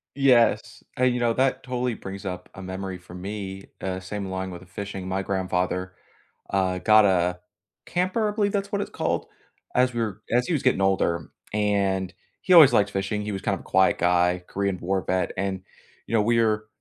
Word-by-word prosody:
Yes. 115 -5 +3
And 125 -1 +3
you 125 - -1
know, 120 -1 +2
that 130 +1 +1
totally 125 -1 -2
brings 100 -1 -8
up 90 -1 -5
a 95 - -8
memory 95 0 -5
for 90 0 -15
me, 95 +1 -6 0.2
uh, 95 -1 -3
same 100 +1 -5
along 95 0 -4
with 90 0 -8
the 95 - -15
fishing, 95 0 -6
my 95 +1 -1
grandfather, 90 -1 -1 0.6
uh, 95 -2 0
got 110 0 +6
a 90 -1 +2 0.5
camper- 185 +5 0
I 210 - -5
believe 205 -2 +1
that's 200 0 -2
what 200 0 0
it's - - -4
called- - - -2 0.5
as 125 0 +3
we 120 - -1
were 105 -1 -3
as 125 +1 +2
he 175 - 0
was 145 - 0
getting 125 -7 +2
older, 85 -5 +1 0.2
and 100 -3 0 0.3
he 185 - +2
always 155 -6 +9
liked 100 0 +3
fishing, 100 +2 -2
he 105 - -4
was 95 - -4
kind 100 - 0
of - - -10
a - - -16
quiet 95 0 +3
guy, 90 +1 +2
Korean 100 -2 -2
War 95 +2 -1
vet, 90 0 0
and, 95 -1 -2 0.5
you - - -6
know, 110 - +4
we're 110 -1 +2
100 Hz, 205 wpm, -25 LUFS, 95-115 Hz, 0.6 s, always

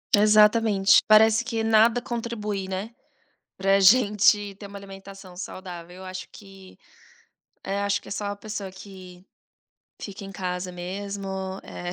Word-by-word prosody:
Exatamente, 210 -1 +5
parece 220 +1 +5
que 230 -2 -3
nada 225 +2 +4
contribui, 225 -5 -4
né, 190 +4 -5 0.7
pra 195 +1 +3
gente 205 -1 +4
ter 200 +1 -11
uma 200 0 -9
alimentação 195 -1 -12
saudável, 180 -2 -8
eu 190 - -10
acho 185 0 -7
que 195 -2 -15 0.8
é, 195 +1 -3
acho 200 0 0
que - - -15
é - - -10
só 205 +1 -4
a 205 0 -4
pessoa 205 -3 -7
que 185 -2 -13 0.8
fica 200 -1 -8
em 195 - -9
casa 180 -1 -4
mesmo, 195 +3 -6 0.3
eh, 175 0 -7
200 Hz, 140 wpm, -25 LUFS, 190-215 Hz, 0.8 s, Exatamente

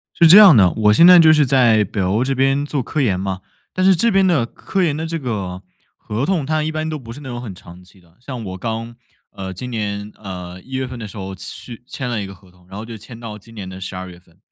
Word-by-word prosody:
是 170 - +5
这 180 - +9
样 205 -7 +10
的， 95 -5 +5
我 105 -1 +3
现 165 +11 +6
在 180 -1 +9
就 160 -1 +7
是 150 -2 +4
在 120 -5 +4
北 100 +1 -4
欧 95 +5 +1
这 135 +1 0
边 135 +2 +1
做 145 -2 -2
科 155 +6 -3
研 105 -9 +1
嘛， 95 0 -4 0.3
但 185 - -1
是 190 0 +6
这 230 +8 +3
边 195 -2 +3
的 165 -10 +2
科 190 +10 -3
研 160 -5 +1
的 160 +2 -4
这 165 0 -3
个 100 - -5 0.3
合 115 +6 -4
同， 180 -6 0
它 155 +2 -1
一 155 - -2
般 155 0 -3
都 155 -1 -4
不 115 -4 -10
是 135 - -11
那 135 - -8
种 120 0 -5
很 110 -6 -8
长 90 0 -14
期 95 +2 -21
的。 85 -1 -26
像 125 -2 -7
我 95 -1 -7
刚， 115 +3 -5 0.4
呃， 95 -1 -7
今 125 +7 -7
年， 105 -2 -4
呃， 90 -2 -8
1 130 - -18
月 130 0 -2
份 125 -1 -8
的 110 -2 -7
时 100 - -12
候 95 -1 -6
去 115 +5 -7
签 130 - -5
了 110 -3 -2
一 100 - -5
个 100 - -10
合 95 0 -21
同， 90 0 -25
然 95 - -10
后 110 - -6
就 115 0 -9
签 115 +2 -12
到 110 -3 -8
今 115 +3 -17
年 100 -4 -7
的 95 0 -9
12 95 0 -6
月 85 -1 -13
份。 85 -1 -28
115 Hz, 295 characters per minute, -19 LUFS, 95-140 Hz, 0.4 s, 样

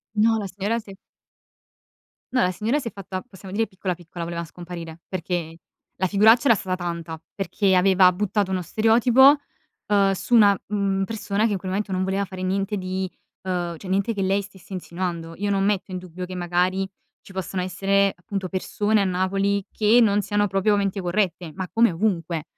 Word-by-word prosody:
No, 225 +1 +4
la 200 - -4
signora 200 +5 -2
si 210 -3 -12
è 195 - -11 1.4
no, 250 - +3
la 180 - +2
signora 225 +10 0
si 250 - -6
è - - -19
fatta, 190 -1 -6
possiamo 190 -5 -12
dire, 225 +2 +1
piccola, 190 -1 -3
piccola, 175 0 -8
voleva 170 0 -4
scomparire, 170 -1 -9
perché 170 -2 -3 0.4
la 185 - +1
figuraccia 220 +6 +5
era 230 - +7
stata 185 -2 -2
tanta, 170 -2 -5
perché 195 -1 +1
aveva 185 0 +5
buttato 200 +1 -1
uno 185 -1 0
stereotipo, 240 - +5 0.5
uhm, 200 -1 +3
su 235 +5 0
una, 205 -3 +6
mhmm, 195 -1 0
persona 215 0 -1
che 225 - +1
in 195 - 0
quel 185 0 -6
momento 200 +1 -2
non 185 0 0
voleva 195 +1 0
fare 185 -1 -8
niente 195 +2 -1
di 185 0 -3 0.3
ehm, 175 -2 -2
cioè 185 - -9
niente 200 +4 +1
che 200 - -3
lei 195 +1 +2
stesse 190 -1 -13
insinuando. 170 -2 -4
Io 205 +1 -1
non 195 -1 +1
metto 195 -1 0
in 185 - -3
dubbio 180 0 -7
che 185 0 -8
magari 180 +2 0 0.3
ci - - -15
possano 190 0 -3
essere, 195 +2 +1
appunto, 185 +1 -5
persone 205 +2 0
a - - +2
Napoli 195 +2 0
che 220 +3 +4
non 205 -2 +3
siano 205 +1 +1
proprio 195 +2 +2
menti 200 -1 -1
corrette, 175 -2 -1
ma 185 +1 -4
come 230 0 +4
ovunque. 170 -4 -1
190 Hz, 190 wpm, -24 LUFS, 180-205 Hz, 1.4 s, era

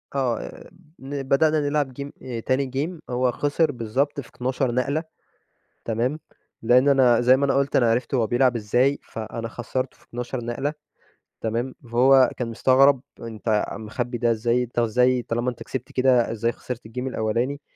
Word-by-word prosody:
آه 130 -4 -3 0.3
ن 135 +1 -5
بدأنا 155 +3 +3
نلعب 145 -2 0
game 140 - -5
آآ 120 -3 -5
تاني 130 +2 -1
game 160 +3 -3
هو 125 0 +2
خسر 145 +4 +1
بالضبط 130 +5 -1
في 130 - -8
12 130 0 -1
نقلة، 140 +5 0 0.8
تمام؟ 120 +7 -1 0.4
لإن 125 +4 +4
أنا 125 -4 +5
زي 130 +2 +5
ما 140 - +1
أنا 135 - +1
قُلت 140 0 +1
أنا 120 -3 +4
عرفت 125 +4 -1
هو 115 -3 +2
بيلعب 125 0 +2
إزاي، 120 +6 +1
فأنا 115 +1 -6
خسّرته 130 +2 -4
في - - -25
12 120 0 -5
نقلة، 135 +5 -2 0.7
تمام؟ 120 +4 -2 0.2
فهو 130 +2 +6
كان 125 - -2
مستغرب، 130 +3 +4 0.2
أنتَ 110 -2 -1
مخبّي 120 +3 -4
ده 120 -1 +2
إزاي؟ 120 +2 +1
أنتَ 120 0 -3
إزاي 125 +2 +3
طالما 120 +2 -1
أنتَ 120 - -8
كسبت 130 -2 -6
كده، 130 -3 +3
إزاي 115 +1 0
خسِرت 120 -3 -7
الgame 110 - -17
الأولاني؟ 120 +5 -1
125 Hz, 165 wpm, -24 LUFS, 115-135 Hz, 0.8 s, فهو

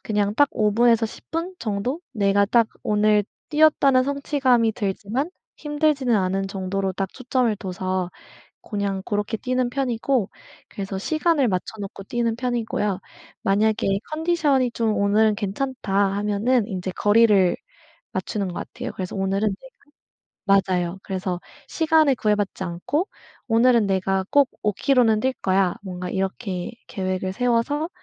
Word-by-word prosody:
그냥 205 0 +1
딱 285 +2 +4
5 210 -1 +1
분에서 230 0 +4
10 - - -11
분 335 +3 -2
정도 225 +9 -2
내가 200 -2 +3
딱 230 +2 +3 0.2
오늘 210 0 +3 0.3
뛰었다는 295 -4 +4
성취감이 265 -5 +1
들지만 215 - -2 0.3
힘들지는 295 -4 +1
않은 195 0 0
정도로 195 0 -2
딱 195 0 -3
초점을 250 -3 0
둬서 185 -1 -3 0.5
고냥 200 -2 -3
그렇게 210 +2 -1
뛰는 255 +1 -1
편이고 250 -3 0 0.4
그래서 195 -1 -5
시간을 310 - +1
맞춰 185 +1 -2
놓고 195 0 -7
뛰는 235 -1 -1
편이고요. 230 -5 -1 0.4
만약에 200 -1 +2
"컨디션이 310 -6 +1
좀 225 -2 0
오늘은 210 +2 +3
괜찮다." 210 +1 -3 0.2
하면은 210 +3 +1
인제 185 -3 -4
거리를 205 -4 +4 0.6
맞추는 205 -3 -2
것 175 - -6
같아요. - - -6
그래서 185 0 -5
오늘은 195 +2 +1 1.0
내가 195 -1 +5
맞아요. 180 0 -1
그래서 185 -2 -3 0.3
시간에 315 -4 +3
구애받지 210 -4 0
않고 185 - -2 0.4
"오늘은 230 -2 +4
내가 190 0 0
꼭 285 -2 +5
5 210 -2 +1
킬로는 230 -3 +3
뛸 260 - +2
거야." 190 -1 +2
뭔가 180 -2 -5
이렇게 190 -1 -3 0.2
계획을 185 -3 -2
세워서 245 - 0
215 Hz, 300 characters per minute, -23 LUFS, 195-255 Hz, 1.0 s, 내가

